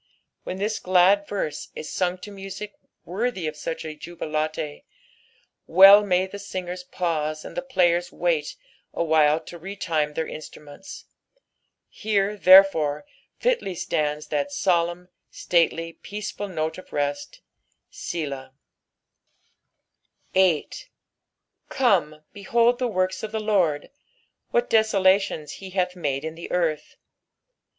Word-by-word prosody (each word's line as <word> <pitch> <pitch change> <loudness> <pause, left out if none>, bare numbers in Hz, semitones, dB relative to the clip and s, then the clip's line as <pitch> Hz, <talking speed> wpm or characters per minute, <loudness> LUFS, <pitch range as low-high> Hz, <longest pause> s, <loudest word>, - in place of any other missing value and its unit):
When 185 - -4
this 210 +3 -2
glad 185 +2 +4
verse 155 -7 -4
is 155 - -6
sung 180 -1 0
to 205 - -10
music 195 +1 -8 0.3
worthy 195 0 -2
of 155 0 -3
such 160 +2 -5
a 155 - -5
jubilate, 155 -2 -4 0.8
well 195 +4 +9
may 185 -2 +2
the 200 +2 -9
singers 185 -2 -6
pause 155 -4 -2
and - - -9
the - - -2
players 175 -9 +1
wait 165 -4 -1 0.4
awhile 155 -2 +3
to 170 - -11
retune 165 -5 -2
their 160 - -1
instruments; 150 +3 -10 0.8
here, 205 -1 -1
therefore, 185 - +6 0.3
fitly 470 - 0
stands 150 -3 -2
that 285 0 -1
solemn, 180 -7 0 0.2
stately, 165 -1 0
peaceful 205 +1 -6
note 160 -2 -3
of - - -15
rest, 145 0 -3 0.5
Bblab. 140 -5 -5 1.8
8 190 - +1 0.8
Come, 170 - +1
behold 235 +4 +2
the 250 - 0
works 185 -3 -1
of 220 - -5
the 220 - -2
LORD, 185 -9 0 0.6
what 240 0 +1
desolations 195 -7 +2
he 190 - -8
hath 180 -1 -1
made 145 -4 -2
in 160 - -4
the 165 +1 -9
earth. 165 -4 -1
180 Hz, 120 wpm, -24 LUFS, 155-200 Hz, 1.8 s, well